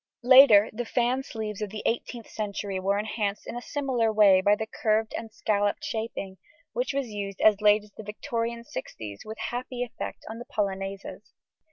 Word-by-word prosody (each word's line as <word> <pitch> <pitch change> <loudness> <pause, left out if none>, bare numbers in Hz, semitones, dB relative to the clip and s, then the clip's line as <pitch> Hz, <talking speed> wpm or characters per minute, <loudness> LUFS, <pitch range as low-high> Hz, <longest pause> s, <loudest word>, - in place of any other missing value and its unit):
Later 245 -5 +8
the 240 +3 -3
fan 245 +2 +1
sleeves 220 -5 -6
of 210 - -2
the 215 +1 -7
18th 235 0 -2
century 200 -2 -4
were 195 +2 +1
enhanced 210 -1 -2
in - - -6
a 240 - -4
similar 255 -5 0
way 200 -3 +6
by 205 +2 +4
the 220 - -3
curved 220 0 0
and 225 -1 -6
scalloped 205 -2 0
shaping, 220 -4 -4 0.3
which - - -1
was 275 -3 -2
used 200 -2 -5
as 210 -1 +5
late 210 0 +5
as 210 - -18
the 220 - -10
Victorian 230 +2 -3
sixties 110 - -7
with 220 +1 -8
happy 245 0 -3
effect 245 - -7
on 220 +1 -7
the 240 - -8
polonaises. 195 -1 -4
215 Hz, 180 wpm, -27 LUFS, 205-235 Hz, 0.3 s, Later